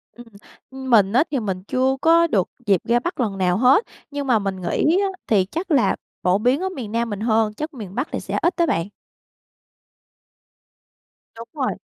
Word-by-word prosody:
Ừm, 240 - -12 0.5
ưm, 265 0 -7
mình 205 -4 +4
á, 260 +6 +5
thì 275 - 0
mình 190 -4 -4
chưa 260 +5 0
có 335 +1 +5
được 195 - 0 0.2
dịp 195 -4 +3
ra 240 +1 +2
Bắc 350 +4 -5
lần 210 -5 -1
nào 180 -1 +1
hết, 255 - +5 0.3
nhưng 285 -1 -4
mà 240 -4 +3
mình 195 -2 -4
nghĩ 315 - +1
á, 400 - +1 0.2
thì 200 -4 +3
chắc 335 - -5
là 275 -5 +3 0.3
phổ 180 +2 +3
biến 250 +6 +1
ở 380 - -1
miền 250 - -7
Nam 230 0 -1
mình 205 -2 -4
hơn, 220 -1 +1
chắc 305 +7 -6
miền 205 -6 -9
Bắc 255 +5 -1
thì - - -2
sẽ - - -4
ít 345 - +3
đó 340 - +3
bạn. 185 - -1 2.5
Đúng 230 +1 -9
rồi. 280 -4 -2
240 Hz, 200 wpm, -21 LUFS, 205-285 Hz, 2.5 s, á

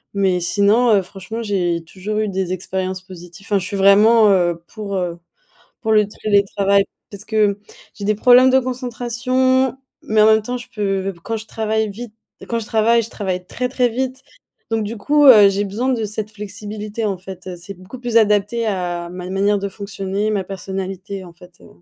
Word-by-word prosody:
mais 190 -2 +2
sinon, 205 +7 +3
heu, 195 - +3
franchement 195 +4 -7
j'ai 175 -5 -1
toujours 195 +5 -5
eu 215 0 0
des 190 -2 -2
expériences 185 0 -3
positif, 180 +1 -12
hein. 200 - +3
Je 185 - -4
suis 200 +1 -4
vraiment, 210 +3 +6
heu, 175 -3 +2
pour, 210 -3 -6
heu, 175 -2 -3 0.6
pour 220 - -2
le 210 -1 +4
télétravail. 200 -1 +1 0.3
Parce 200 0 -7
que 210 -2 +1 0.4
j'ai 205 - -8
des 215 +1 +2
problèmes 250 +4 +6
de 260 - +5
concentration, 255 +1 0 0.3
mais 215 0 +1
en 215 - +7
même 220 0 +5
temps, 245 +3 -4
je 245 0 -11
peux 195 -4 -2
b 190 - -12
quand 225 +4 -3
je 220 - -10
travaille 220 0 -1
vite, 215 +2 -8 0.3
quand 235 - -1
je 225 - -5
travaille, 230 +2 +3
je 225 - -7
travaille 185 -5 -4
très, 250 +6 -3
très 250 -1 +2
vite. 260 +2 -3 0.5
Donc 225 -1 0
du 220 +2 -5
coup, 295 +7 +3
heu, 215 -7 +9
j'ai 195 +1 0
besoin 215 +6 -2
de 225 -2 -2
cette 210 0 -4
flexibilité, 210 +1 -6
en 200 -2 -1
fait, 185 0 -11
heu. 185 -1 -6
C'est 175 +3 -9
beaucoup 185 +8 -11
plus 240 -2 +2
adapté 210 +2 +2
à 175 -4 -2
ma 180 +1 -8
n 185 - -6
manière 200 +2 +2
de 200 0 -4
fonctionner, 200 +1 -3
ma 200 -3 -1
personnalité, 190 0 -6
en 175 - -12
fait, 180 +1 -17
heu. - - -15
205 Hz, 200 wpm, -19 LUFS, 190-225 Hz, 0.6 s, heu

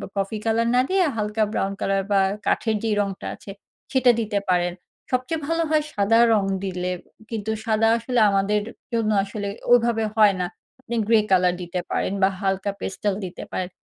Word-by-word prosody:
Coffee 200 +2 -2
colour 230 +1 +2
না 250 - +5
দিয়ে 380 -1 +3
হালকা 210 +1 0
ব্রাউন 195 -2 -1
কালার 195 0 +1
বা 200 - +4 0.3
কাঠের 220 -2 +1
যে 225 - 0
রংটা 195 -2 -2
আছে 200 - -11 0.4
সেটা 260 -2 +5
দিতে 210 -2 -1
পারেন। 175 -1 +2 0.4
সবচেয়ে 255 +6 -1
ভালো 330 +1 +1
হয় 310 -1 +2
সাদা 205 +3 +3
রং 210 -2 +3 0.2
দিলে 180 -1 -2 0.4
কিন্তু 220 -1 -3
সাদা 220 0 +2
আসলে 240 +1 -1
আমাদের 200 +1 +1 0.3
জন্য 225 -2 +1
আসলে 205 0 -5 0.2
ওইভাবে 235 -2 +4
হয় 210 -2 +6
না। 180 - 0 0.4
আপনি 235 -2 -5
গ্রে 225 -1 +5
কালার 180 -1 +4
দিতে 180 +1 -4
পারেন - - 0
বা 190 - +6
হালকা 195 0 0
পেস্টাল 200 +1 -2
দিতে 180 - -7
পারেন। 185 -1 -3
210 Hz, 175 wpm, -23 LUFS, 195-230 Hz, 0.4 s, হয়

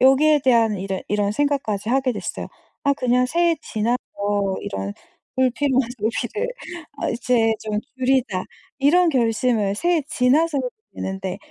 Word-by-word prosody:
여기에 290 +4 +5
대한 230 -5 +3
이제 190 0 -3
이런 205 -1 +1
생각까지 230 -5 -1
하게 260 0 +2
됐어요. 210 - -5 0.4
'아 280 0 +3
그냥 250 -1 +2
새해 340 +4 +2
지나서 230 +3 -1 0.6
이런 100 +1 -4 0.4
불필요한 260 0 +2
소비를 240 - -1 0.6
어 - - +1
이제 235 -1 +2
좀 210 -1 -2 0.2
줄이자.' 255 -7 +1 0.3
이런 335 +5 +4
결심을 225 -4 +1
새해 345 +8 +2
지나서 285 +5 +2
해도 255 -2 -1 0.2
되는데 190 -1 -4
250 Hz, 295 characters per minute, -22 LUFS, 215-275 Hz, 0.6 s, 여기에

